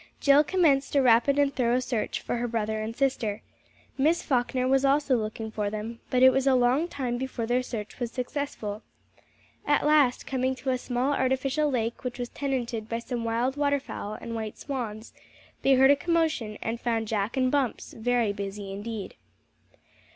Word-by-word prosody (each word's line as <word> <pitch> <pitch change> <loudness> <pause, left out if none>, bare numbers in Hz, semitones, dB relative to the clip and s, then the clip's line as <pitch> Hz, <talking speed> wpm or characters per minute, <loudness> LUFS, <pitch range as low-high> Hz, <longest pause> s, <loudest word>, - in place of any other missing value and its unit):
Jill 280 +1 +6
commenced 295 -6 +2
a 280 - +5
rapid 245 +3 +4
and 285 -1 +3
thorough 245 -1 +2
search 245 -3 -2
for - - -2
her 240 +1 -1
brother 220 -2 -2
and 220 +1 -4
sister. 235 -6 -1 0.6
Miss 315 +5 +3
Falkner 255 -1 0
was 270 +1 +3
also 275 -1 +3
looking 220 -1 -3
for 210 -2 -2
them, 215 +2 -5
but 255 0 +3
it 260 - +9
was 270 +1 0
a 265 - +5
long 255 +6 +3
time 250 -7 -3
before 260 -3 -3
their 245 +2 +1
search 220 -4 -6
was 240 -2 -3
successful. 250 -5 -4 0.8
At 290 0 +2
last 295 -5 +3
coming 260 0 -1
to 260 +1 -2
a 255 - 0
small 250 +3 -1
artificial 270 +3 +1
lake 235 -3 -2
which 250 -1 -4
was 245 -1 -4
tenanted 240 -5 -3
by 230 - -1
some 235 0 -4
wild 235 +4 0
waterfowl 285 -7 -1
and 230 - -6
white 220 -2 -5
swans, 230 -6 -5 0.5
they 270 - +4
heard 265 +1 +6
a - - +6
commotion, 310 -10 0
and 225 +1 -3
found 225 -2 -1
Jack 210 +3 -1
and 255 -1 +2
Bumps 275 -5 -1
very 235 -2 +1
busy 200 0 -6
indeed. 210 +1 -6
250 Hz, 180 wpm, -27 LUFS, 225-275 Hz, 0.8 s, it